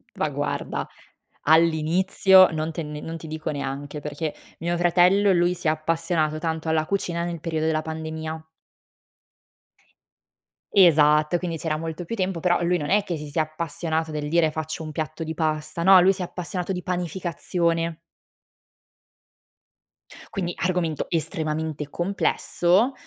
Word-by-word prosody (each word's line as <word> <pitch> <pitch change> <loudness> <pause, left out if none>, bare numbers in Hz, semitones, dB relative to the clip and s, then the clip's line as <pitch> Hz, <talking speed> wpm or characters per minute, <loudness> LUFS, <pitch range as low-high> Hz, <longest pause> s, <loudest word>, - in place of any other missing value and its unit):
Ma - - 0
guarda, - - -3 0.6
all'inizio 170 +4 +5
non 160 0 -2
te 165 +1 -4
ne 150 0 -6
non 165 0 -6
ti 160 - -10
dico 155 0 -4
neanche, 145 0 -4
perché 150 +1 -4 0.3
mio 175 +1 -1
fratello, 180 +3 +4
lui 175 0 +3
si 175 - -4
è - - +6
appassionato 155 0 0
tanto 160 0 -3
alla 160 -1 +1
cucina 170 -2 -1
nel 170 -1 -4
periodo 160 -1 -2
della 160 -1 +1
pandemia. 160 0 -5 2.3
Esatto, 155 -3 +5
quindi 170 -2 -4
c'era 155 -1 -2
molto 165 +2 -5
più 200 +7 -5
tempo, 185 -4 -1
però 175 0 +2
lui 175 +1 +2
non 150 -3 -4
è 205 +1 +3
che 180 -4 -3
si 150 -1 -7
sia 155 +2 +1
appassionato 160 0 -3
del 150 -1 -3
dire: 160 0 +2
"Faccio 155 +1 -4
un 155 - -6
piatto 155 +1 -4
di 160 0 -4
pasta", 155 0 -2
no, 190 +1 +8
lui 185 +2 +5
si 190 - -7
è - - -1
appassionato 180 +1 -4
di 180 -1 -5
panificazione. 170 -1 -1 2.4
Quindi 175 -4 -2
argomento 175 -4 -1
estremamente 155 -2 -2
complesso. 190 - +1
165 Hz, 145 wpm, -24 LUFS, 155-175 Hz, 2.4 s, no